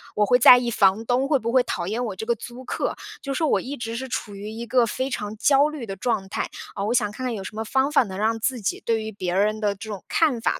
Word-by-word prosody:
我 210 Hz, -, +3 dB
会 245 Hz, +4 st, +4 dB
在 250 Hz, +1 st, +10 dB
意 245 Hz, -1 st, -1 dB
房 205 Hz, +1 st, +3 dB
东 250 Hz, +3 st, +1 dB
会 280 Hz, -4 st, +3 dB
不 230 Hz, +2 st, -3 dB
会 255 Hz, -1 st, +5 dB
讨 175 Hz, -6 st, -3 dB
厌 230 Hz, +4 st, -2 dB
我 205 Hz, -5 st, -4 dB
这 220 Hz, -, -4 dB
个 235 Hz, +1 st, +1 dB
租 245 Hz, +3 st, -10 dB
客。 -, -, -2 dB, 0.2 s
就 275 Hz, -1 st, -3 dB
说 315 Hz, +3 st, 0 dB
我 -, -, +2 dB
一 280 Hz, +3 st, -6 dB
直 230 Hz, -1 st, -5 dB
是 260 Hz, +2 st, -5 dB
处 205 Hz, -5 st, -4 dB
于 205 Hz, +2 st, -7 dB
一 230 Hz, +2 st, -6 dB
个 245 Hz, -1 st, +3 dB
非 260 Hz, +4 st, -2 dB
常 210 Hz, -3 st, -4 dB
焦 285 Hz, +5 st, +4 dB
虑 295 Hz, -6 st, -6 dB
的 195 Hz, -2 st, -6 dB
状 210 Hz, -2 st, -1 dB
态， -, -, -3 dB, 0.3 s
呃， 200 Hz, 0 st, -2 dB
我 235 Hz, -, +1 dB
想 210 Hz, -4 st, +2 dB
看 235 Hz, +5 st, -8 dB
看 250 Hz, -2 st, -1 dB
有 200 Hz, -, -5 dB
什 200 Hz, +3 st, -8 dB
么 220 Hz, -, -2 dB
方 265 Hz, +5 st, +1 dB
法 275 Hz, -, +5 dB
能 190 Hz, -3 st, -7 dB
让 225 Hz, +2 st, +1 dB
自 250 Hz, +1 st, 0 dB
己 205 Hz, -, -2 dB
对 225 Hz, -1 st, +1 dB
于 220 Hz, 0 st, -6 dB
别 180 Hz, -3 st, -3 dB
人 215 Hz, +3 st, +1 dB
的 205 Hz, -1 st, +1 dB
这 215 Hz, +2 st, -10 dB
种 200 Hz, -3 st, -6 dB
看 290 Hz, -8 st, +2 dB
法， -, -, 0 dB
225 Hz, 315 characters per minute, -24 LUFS, 210-255 Hz, 0.3 s, 在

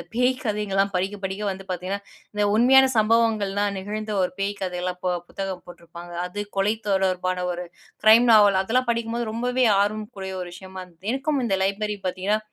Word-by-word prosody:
இந்த -, -, -8 dB
பேய் 250 Hz, +2 st, +3 dB
கதைகள்லாம் 200 Hz, -3 st, 0 dB
படிக்க 195 Hz, +3 st, -1 dB
படிக்க 190 Hz, +2 st, -3 dB
வந்து 195 Hz, 0 st, -5 dB
பார்த்தீங்கன்னா, 185 Hz, +3 st, -3 dB, 0.3 s
இந்த 210 Hz, -, 0 dB
உண்மையான 265 Hz, +3 st, +6 dB
சம்பவங்கள்லாம் 210 Hz, -2 st, +2 dB
நிகழ்ந்த 210 Hz, +2 st, -4 dB
ஒரு 180 Hz, -, 0 dB
பேய் 200 Hz, +1 st, 0 dB
கதைலாம் 180 Hz, -1 st, -3 dB
போ 180 Hz, -, +2 dB, 0.2 s
புத்தகம் 190 Hz, -2 st, -5 dB
போட்ருப்பாங்க. 175 Hz, 0 st, -11 dB
அது 195 Hz, +3 st, -6 dB, 0.2 s
கொலை 200 Hz, +3 st, +2 dB
தொடர்பான 185 Hz, -2 st, 0 dB
ஒரு 175 Hz, +1 st, -5 dB, 0.4 s
கிரைம் 225 Hz, +3 st, +7 dB
நாவல் 205 Hz, -3 st, +6 dB
அதெல்லாம் 250 Hz, +6 st, +1 dB
படிக்கும்போது 230 Hz, 0 st, -1 dB
ரொம்பவே 250 Hz, +2 st, 0 dB, 0.2 s
ஆர்வம்க்குரிய 205 Hz, -2 st, -3 dB
ஒரு 175 Hz, -, -7 dB
விஷயமா 190 Hz, 0 st, -9 dB
இருந்தது. 180 Hz, +3 st, -12 dB
எனக்கும் 275 Hz, +1 st, -1 dB
இந்த 195 Hz, -3 st, +1 dB
லைப்ரரி 205 Hz, +2 st, -1 dB
பார்த்தீங்கன்னா 190 Hz, +3 st, 0 dB
200 Hz, 165 wpm, -24 LUFS, 190-220 Hz, 0.4 s, கிரைம்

